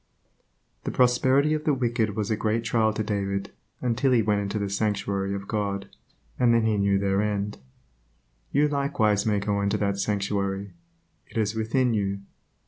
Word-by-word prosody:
The - - -2
prosperity 130 +4 +3
of 155 0 -1
the 150 -3 +3
wicked 120 -4 0
was 105 0 -2
a - - +3
great 110 +1 0
trial 115 -1 +2
to 110 0 -2
David 100 -2 -2 0.3
until 125 +2 +1
he 115 -3 +4
went 105 -1 +1
into 100 +1 -3
the 100 -1 -1
sanctuary 100 -1 -1
of 100 0 -6
God, 100 -2 -2 0.5
and 120 -2 +4
then 115 -1 +3
he 110 -2 +1
knew 100 0 +3
their 100 0 +1
end. 105 -1 -2 0.9
You 145 +2 +3
likewise 130 -8 +1
may 105 -1 +2
go 100 0 0
into 100 0 +1
that 100 -1 -1
sanctuary. 100 -1 -1 0.5
It - - -9
is 105 -1 +1
within 115 +3 +1
you. 100 -2 -1
105 Hz, 170 wpm, -26 LUFS, 100-115 Hz, 0.9 s, he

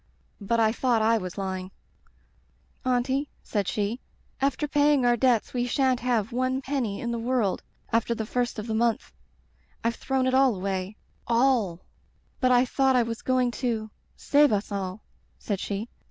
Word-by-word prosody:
*'But 230 +3 +1
I 220 -1 +4
thought 235 -2 +1
I 225 +1 +3
was 185 -1 -7
lying. 190 -1 -3 0.6
"* - - -38
Auntie,' 265 +4 0
said 205 -4 -2
she, 210 +3 -1 0.2
* - - -32
after 295 +3 -3
paying 290 -2 +3
our 240 0 +4
debts 240 -2 +2
we 245 -1 0
sha'n't 260 0 +2
have 235 -4 0
one 255 +2 0
penny 260 -7 -2
in 235 - -3
the 235 - -2
world 235 -4 0 0.3
after 230 +1 +2
the 220 - -3
first 245 +1 -1
of 215 - -4
the 225 - -3
month. 230 0 0 0.7
I've 230 0 +1
thrown 265 +1 -1
it 260 - +1
all 265 -3 +4
away 190 +1 -3 0.2
— - - -38
^all 230 -8 +2 0.3
— - - -39
^but 255 - +4
I 250 0 +5
thought 265 +1 +2
I 245 - +4
was 230 0 -5
going 255 -1 +1
to 225 -4 -1
— - - -40
^save 290 0 +4
us 205 0 -1
all,' 195 0 -4 0.3
said 200 -3 -3
she. 205 +3 -3
235 Hz, 185 wpm, -26 LUFS, 215-255 Hz, 0.7 s, I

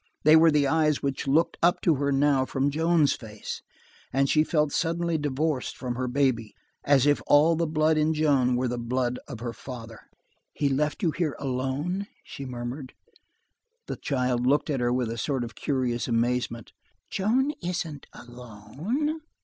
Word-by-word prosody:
They 155 +1 +7
were 165 +1 +7
the 150 -2 +3
eyes 150 0 +2
which 140 0 -2
looked 155 +5 +2
up 175 +2 +3
to 170 - +3
her 140 +1 0
now 140 -1 +3
from 135 +2 -1
Joan's 160 0 +3
face, 105 -3 -7 0.5
and 135 +1 +2
she 155 +2 +4
felt 150 -2 +1
suddenly 170 +1 0
divorced 145 -1 -1
from 125 -2 -3
her 125 +1 -3
baby, 125 -5 0 0.3
as 140 -2 +4
if 145 0 +3
all 155 +3 +5
the 165 0 0
blood 155 0 +2
in 155 +1 +2
Joan 140 -5 +2
were 125 +1 0
the 120 0 -3
blood 125 +1 -1
of 120 -6 -8
her 120 -1 -4
father. 115 -4 -10 0.4
"He 145 - 0
left 150 +7 -1
you 165 - +3
here 160 -3 -2
alone?" 140 +9 -2 0.2
she 140 - -8
murmured. 125 +2 -6 0.9
The - - -4
child 125 -3 -1
looked 145 +3 +2
at 135 - -1
her 120 0 +1
with 125 -2 0
a 115 - -5
sort 135 -2 -1
of 115 -1 -7
curious 125 0 -1
amazement. 120 -1 -1 0.4
"Joan 250 +9 +1
isn't 170 -5 -4
alone." 135 - -5
140 Hz, 170 wpm, -26 LUFS, 125-155 Hz, 0.9 s, They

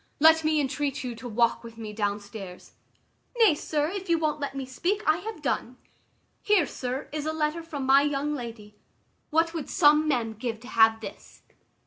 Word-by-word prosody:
Let 320 +1 +6
me 310 0 +2
entreat 285 0 -2
you 250 -2 -4
to 240 +2 -8
walk 235 +1 +1
with 230 -1 -11
me 215 -2 -7
down 205 -1 -1
stairs." 200 -3 -10 0.7
"Nay, 445 -8 +6
sir, 295 0 -1
if 385 -2 -6
you 335 - +4
won't 305 -2 -1
let 285 -1 -4
me 270 -1 -4
speak, 360 +11 -2
I 310 +1 +4
have 390 -3 -7
done. 250 -1 -2 0.6
Here, 410 -6 +3
sir, 255 0 -4
is 305 0 -3
a - - +1
letter 315 +1 -1
from 295 -5 -5
my 270 +1 +6
young 290 +1 -1
lady 230 -6 -7 0.6
what 330 +1 +2
would 325 -4 -5
some 305 -2 +4
men 240 -6 0
give 225 0 -4
to 245 - -11
have 225 -1 +4
this? - - -10
285 Hz, 190 wpm, -27 LUFS, 235-315 Hz, 0.7 s, Let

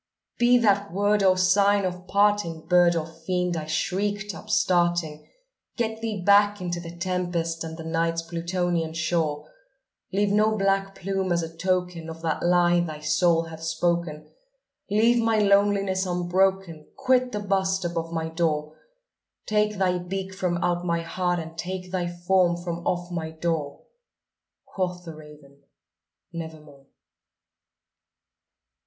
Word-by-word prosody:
"Be 240 +1 +5
that 200 -3 +2
word 205 +3 +2
our 185 -1 +4
sign 200 +2 +3
of 180 0 -5
parting, 200 -5 +1
bird 175 -1 +4
or 160 -2 -1
fiend!" 175 +2 -2
I 155 -2 -4
shrieked 200 +5 -1
upstarting 175 -6 0 0.5
"Get 220 -2 -2
thee 220 -3 -3
back 205 0 +5
into 175 -1 -3
the 170 0 -9
tempest 175 -2 -2
and 160 0 -7
the 165 - -7
Night's 165 +1 -1
Plutonian 170 -1 -2
shore! 160 -2 -1 0.6
Leave 200 +1 +1
no 215 +1 +3
black 195 0 0
plume 195 0 -2
as 170 -1 +1
a 165 0 -7
token 180 -1 -1
of 165 0 -9
that 160 -2 -1
lie 175 0 +3
thy 155 -3 -3
soul 165 +2 +2
hath 160 -1 -10
spoken! 165 -1 -1 0.6
Leave 230 +4 +3
my 225 -1 +2
loneliness 200 -2 +2
unbroken! 180 -2 0
quit 255 -1 +2
the 210 - -3
bust 190 -2 0
above 165 -1 -3
my 160 -1 -2
door! 155 -2 -1 0.7
Take 210 0 +1
thy 180 -1 +1
beak 190 +2 -5
from 180 -2 -1
out 175 0 0
my 170 -1 0
heart, 175 +1 -1
and 165 -1 -6
take 185 +1 -5
thy 180 -2 -1
form 175 0 +2
from 175 -1 -4
off 175 0 -1
my 165 -2 -3
door!" 160 -3 -3 0.8
Quoth 180 -2 -4
the 165 - -7
raven, 150 -2 -15 0.7
"Nevermore." 155 -4 -9
175 Hz, 140 wpm, -25 LUFS, 165-195 Hz, 0.8 s, Be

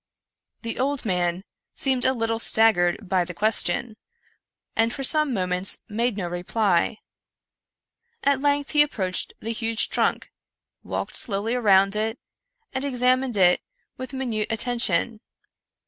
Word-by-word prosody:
The 230 - -4
old 275 0 -1
man 180 -2 -1 0.3
seemed 260 -2 +1
a 260 - +3
little 225 -2 -1
staggered 215 -4 +3
by 185 -1 +2
the 175 0 -8
question, 215 +2 0 0.8
and 225 +1 +2
for 270 - -5
some 305 +1 +2
moments 185 -3 0
made 230 +1 -1
no 180 -4 -3
reply. 175 +3 0 1.3
At 280 -1 +2
length 285 0 +1
he 295 - +5
approached 190 -11 -1
the 225 +1 -3
huge 225 0 -1
trunk, - - 0 0.5
walked - - -4
slowly 210 +1 -1
around 195 -4 +3
it, 220 +2 -1 0.6
and 260 0 -2
examined 255 -2 +1
it 180 -2 +4 0.3
with 255 0 -7
minute 240 -6 -2
atten 235 +2 0
tion. 215 +3 0
225 Hz, 130 wpm, -24 LUFS, 190-255 Hz, 1.3 s, he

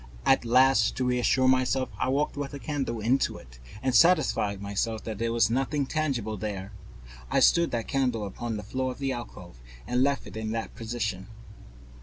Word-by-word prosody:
And 135 - +5
to 125 0 +3
reassure 125 +1 +2
myself, 130 0 +2
I - - 0
walked 145 +3 0
with 145 0 -5
a - - -5
candle 135 -6 -3
into 125 +5 +1
it - - -15 0.2
and 130 - +1
satisfied 130 - +3
myself 100 +2 -2
that 110 -3 -6
there 115 0 0
was 115 -1 +2
nothing 135 +3 0
tangible 130 -8 -2
there. 100 -1 -5 0.6
I - - +2
stood 170 0 +4
that 115 -2 -3
candle 125 -6 0
upon 110 +3 -4
the 105 - -6
floor 130 +5 -2
of - - -9
the 135 -1 -2
alcove 90 - -8 0.2
and 125 +1 0
left 140 0 +1
it - - -11
in 110 0 -3
that 115 0 -4
position. 110 -5 -4
120 Hz, 180 wpm, -27 LUFS, 110-135 Hz, 0.6 s, And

